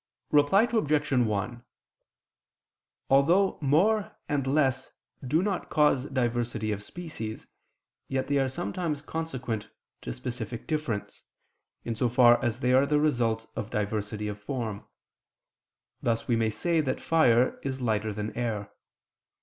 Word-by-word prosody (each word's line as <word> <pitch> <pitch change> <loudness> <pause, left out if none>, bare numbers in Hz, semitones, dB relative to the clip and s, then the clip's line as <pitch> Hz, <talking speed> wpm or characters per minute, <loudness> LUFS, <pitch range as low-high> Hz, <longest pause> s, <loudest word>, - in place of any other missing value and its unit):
Reply 150 +8 +5
Obj. 155 -12 +1
1: 120 -1 0 1.5
Although 170 +9 +4
more 190 +10 +2
and 140 -2 -1
less 130 -2 +1 0.3
do 155 +7 +1
not 195 -3 -2
cause 145 -3 +3
diversity 120 -4 -1
of 105 -1 -3
species, 115 -6 -7 0.6
yet 130 0 -1
they 140 0 +2
are 135 -1 +1
sometimes 145 - -3
consequent 130 -9 -4 0.3
to 60 - -5
specific 120 - -5
difference, 150 -10 -3 0.6
in 115 - -1
so 120 +2 0
far 120 0 +5
as 120 +1 -1
they 125 0 +2
are 135 +2 +5
the 150 0 +3
result 120 -7 +1
of 110 0 -4
diversity 105 -1 -2
of 105 0 -6
form; 110 -3 -4 1.2
thus 115 -1 -1
we 120 - +2
may 115 -1 +2
say 160 +10 +1
that 130 -3 -2
fire 125 -7 +3
is 135 -1 -3
lighter 110 -3 0
than 105 +1 -5
air. 110 -4 -3
125 Hz, 135 wpm, -28 LUFS, 110-150 Hz, 1.5 s, Reply